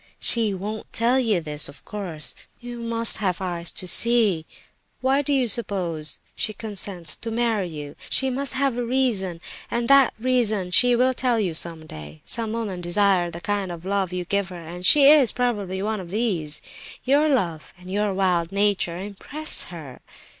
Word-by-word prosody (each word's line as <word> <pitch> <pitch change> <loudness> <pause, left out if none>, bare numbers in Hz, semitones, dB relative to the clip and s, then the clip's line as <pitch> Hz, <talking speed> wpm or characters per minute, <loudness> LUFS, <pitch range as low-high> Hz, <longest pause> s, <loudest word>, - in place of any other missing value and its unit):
She 225 -3 +3
won't 205 +3 -6
tell 240 +3 +1
you 220 -8 +1
this, 150 -2 0
of 145 - -15
course; 180 -8 -4 0.3
you 240 0 -8
must 230 -1 +5
have 185 -4 -1
eyes 175 -3 -3
to 185 - -3
see. 215 -7 +4 0.5
Why 265 +2 +1
do 290 - 0
you 265 -3 +2
suppose 180 -8 -1 0.2
she 215 - -3
consents 195 -6 +3
to 230 - -6
marry 225 -4 -1
you? 150 -3 -8
She 265 0 +3
must 275 +2 -2
have 275 -2 +1
a 245 - -1
reason, 230 -9 -1 0.3
and 235 0 -2
that 275 -3 +5
reason 220 -7 0
she 245 +6 +4
will 255 +2 +2
tell 245 -2 0
you 185 -6 -1
some 165 0 -1
day. 75 - -11
Some 225 -2 -1
women 210 -6 -4
desire 180 0 +2
the 170 0 -8
kind 200 -2 -2
of 170 0 -9
love 195 -2 -1
you 180 -1 -4
give 200 +1 -1
her, 175 -3 -10
and 175 +2 -9
she 295 - +6
is 285 -6 +6
probably 205 -6 -2
one 215 0 -2
of 180 -2 -9
these. 180 -8 -2 0.4
Your 290 +4 +2
love 175 - -1
and 180 +1 -12
your 205 +1 0
wild 180 -3 0
nature 200 -4 0
impress 205 +11 -2
her. 155 -7 -10
200 Hz, 180 wpm, -23 LUFS, 175-235 Hz, 0.5 s, she